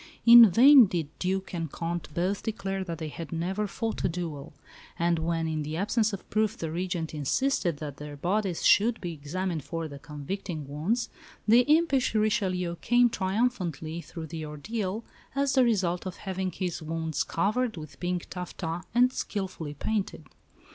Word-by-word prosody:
In 235 -2 +10
vain 255 +4 +8
did 165 -5 -2
Duc 190 +1 -2
and 165 -4 -3
Comte 170 -2 -4
both 185 +4 0
declare 195 -3 -3
that 170 -3 -5
they 160 -1 -5
had 165 +2 -8
never 185 +5 -1
fought 225 +2 -3
a - - +2
duel; 165 -5 -5 0.5
and 170 0 +1
when, 165 0 -1
in 155 -1 -2
the 155 +2 -4
absence 215 +3 +1
of 200 - -7
proof, 215 -1 +1
the 160 -1 -4
Regent 175 -1 -3
insisted 170 - 0
that 145 -2 -6
their 150 0 -8
bodies 190 +2 -1
should 225 +3 +5
be 175 -2 -4
examined 160 +2 -3
for 165 +1 -4
the 140 -2 -9
convicting 150 +2 -6
wounds, 170 - -1 0.4
the 230 +3 +7
impish 305 -7 +3
Richelieu 185 -5 +1
came 240 +3 +3
triumphantly 185 - -1
through 165 -1 -8
the 160 0 -6
ordeal 190 +8 -4 0.3
as 275 0 +1
the 260 - +5
result 190 -6 +1
of 185 - -5
having 190 -1 -3
his 180 -3 -3
wounds 160 -1 -2
covered 215 +4 0
with 155 -2 -9
pink 180 -1 -2
taffeta 175 -2 -5
and 250 +1 +5
skilfully 185 -7 -4
painted! 210 +6 -2
180 Hz, 165 wpm, -28 LUFS, 160-215 Hz, 0.5 s, In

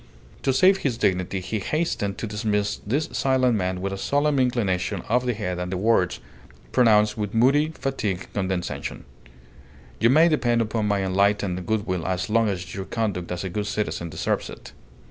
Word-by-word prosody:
To 135 - +1
save 185 +9 +5
his 135 -10 -1
dignity 95 -2 0
he 110 +4 -3
hastened 105 - -1
to - - -4
dismiss 105 -1 -1
this 145 +8 0
silent 130 -3 +2
man 90 -2 -1
with 100 +1 -2
a 95 - -5
solemn 145 +2 +1
inclination 105 -7 0
of 125 +2 +1
the 120 - 0
head 90 -4 -3
and 90 0 -4
the 95 - -1
words, 95 -3 +2 0.5
pronounced 105 -3 +4
with 105 0 -3
moody, 140 +7 +4
fatigued 105 -9 -3
condescension 95 -3 -3 0.9
"You 115 - +4
may 155 +6 +6
depend 120 -7 +2
upon 110 -1 0
my 100 -1 +1
enlightened 95 -1 +1
goodwill 100 -6 -1
as 95 +2 -2
long 115 -1 +3
as 90 -3 -4
your 95 -1 -5
conduct 100 -7 -2
as 90 0 -3
a 95 - -3
good 105 +2 -2
citizen 105 -5 -2
deserves - - -2
it." - - -11
105 Hz, 175 wpm, -24 LUFS, 95-120 Hz, 0.9 s, may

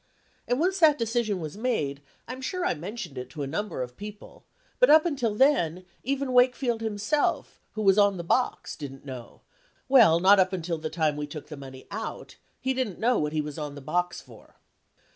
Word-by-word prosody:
And 245 +2 +1
once 370 +4 +1
that 310 -3 +6
decision 230 -3 -1
was 155 -1 -6
made, 180 - -1 0.3
I'm 255 +1 -7
sure 365 +6 -2
I - - +2
mentioned 175 - -6
it 125 - -7
to 150 -3 -5
a - - -2
number 165 -1 -3
of 125 0 -9
people, 210 0 -10 0.4
but - - +6
up 310 +1 +7
until 250 -10 -1
then, 185 - +2 0.2
even 275 0 -2
Wakefield 250 -2 +3
himself 220 +7 -1
who 215 - -3
was 195 0 +5
on 200 -2 +4
the 170 - -5
box 250 +9 0
didn't 135 -2 -9
know, 130 -4 -9 0.5
well 230 -11 +6
not 195 +3 +6
up 185 0 +3
until 170 -2 -2
the 155 0 -4
time 155 -3 0
we 150 0 -3
took 150 0 -9
the 155 - -6
money 130 -2 -11
out 220 +2 -6 0.2
he 265 - 0
didn't 255 -8 -2
know 245 +2 +2
what 150 0 -1
he 155 -1 0
was 150 +1 -6
on 150 -1 -5
that 145 - -9
box 180 +6 -1
for." - - -17
200 Hz, 200 wpm, -27 LUFS, 155-250 Hz, 0.5 s, up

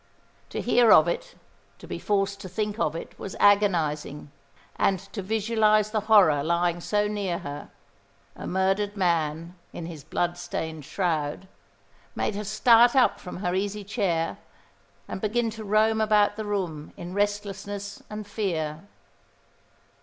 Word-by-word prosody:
To - - -4
hear 240 -1 +4
of - - +7
it, - - -3 0.4
to - - -12
be - - -5
forced 200 -1 0
to 190 - -8
think 210 +3 -3
of 155 -5 0
it, 165 - -8
was 195 - -6
agonising; 160 -8 +2 0.5
and 195 - +2
to 195 +3 -8
visualise 215 +1 +2
the 215 - +1
horror 185 -10 +6
lying 170 +2 0
so 210 +3 +1
near 200 -4 -2
her, 145 -2 -7 0.7
a - - -7
murdered 195 +2 0
man 165 -2 0 0.2
in 170 - -6
his 160 -4 -8
bloodstained 165 -2 -3
shroud, 165 -1 -2 0.7
made - - -1
her 205 +1 -4
start 230 +4 +5
up 260 -2 +4
from 180 - -8
her 180 - +1
easy 200 +2 -2
chair 190 -6 -1 0.7
and - - -6
begin 225 +2 0
to 220 0 -8
roam 215 +2 +2
about 210 -1 +3
the 215 0 -5
room 180 -7 -3
in 175 +1 -7
restlessness 205 0 -3
and 210 0 -6
fear. 170 -5 -3
200 Hz, 145 wpm, -26 LUFS, 170-210 Hz, 0.7 s, of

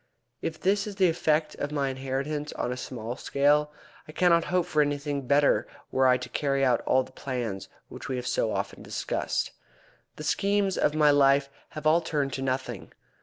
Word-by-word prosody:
If 160 -1 -4
this 200 +2 +1
is 205 - -6
the 190 -3 +4
effect 155 -1 +1
of 145 - -3
my 140 -2 0
interference 135 +3 -3
on - - -2
a - - -2
small 120 -2 -5
scale, 150 +2 +2 0.4
I - - -9
cannot 170 0 +3
hope 180 -1 +1
for 155 -4 +2
anything 145 -2 -2
better 145 +1 +3 0.2
were 130 0 +3
I 125 0 +5
to 125 - -8
carry 140 -2 0
out 125 -3 +2
the 130 0 +2
plans 120 -8 -4 0.2
which - - -9
we 130 - -1
have 125 -1 -4
so 110 - 0
often - - -3
discussed. - - -2 0.6
The 150 - -8
schemes 200 +4 +1
of 150 - +1
my 150 -1 +5
life 140 0 +4 0.3
have 155 - -6
all 160 +2 +5
turned 145 -4 -1
to 135 - -3
nothing. 130 -4 -3
145 Hz, 185 wpm, -27 LUFS, 130-155 Hz, 0.6 s, I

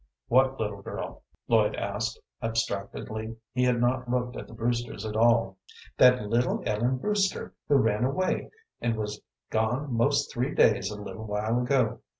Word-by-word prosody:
"What 130 +2 +4
little 105 -2 -3
girl?" - - -6 0.3
Lloyd 110 -2 +3
asked, 105 +3 -3 0.2
abstractedly. 110 0 -3 0.2
He 125 +1 +1
had 125 -1 +2
not 125 +1 +1
looked 125 0 -1
at - - -7
the - - -12
Brewsters 120 -2 -2
at 110 -1 -4
all. 115 -4 +3 0.4
"That 125 -4 +6
little 120 +4 +1
Ellen 120 +4 +1
Brewster 200 +6 0
who 145 - +4
ran 110 -4 +3
away 185 +9 0 0.3
and 115 -1 0
was 105 -1 -4 0.3
gone 120 +5 0
most 140 +5 +2
three 125 +5 -1
days 110 - +4
a 105 -1 -6
little 110 +2 -7
while 110 +3 0
ago. 125 -3 +1
115 Hz, 155 wpm, -28 LUFS, 110-125 Hz, 0.4 s, That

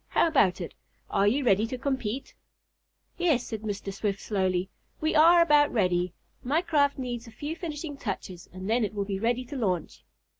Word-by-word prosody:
How - - +3
about 210 - +3
it? 170 - -6 0.4
Are 200 +1 +3
you 260 +6 +2
ready 210 0 +3
to 255 - -4
compete?" 260 -2 -3 0.9
"Yes," 310 -9 +2
said 220 -2 -5
Mr. 200 -2 -4
Swift 200 0 -2
slowly. 190 -3 0 0.3
"We 315 +1 0
are 335 +2 +7
about 295 -3 +4
ready. 180 -5 +1 0.3
My 300 +7 +1
craft 290 -5 +2
needs 245 -2 -4
a - - -11
few 290 +8 -5
finishing 310 -4 -5
touches, 190 -6 -6
and 185 +1 -7
then 230 +2 +2
it 210 0 -3
will 200 -1 -1
be 195 -1 -3
ready 240 +3 0
to 285 - -8
launch." 185 - -2
235 Hz, 185 wpm, -27 LUFS, 195-290 Hz, 0.9 s, are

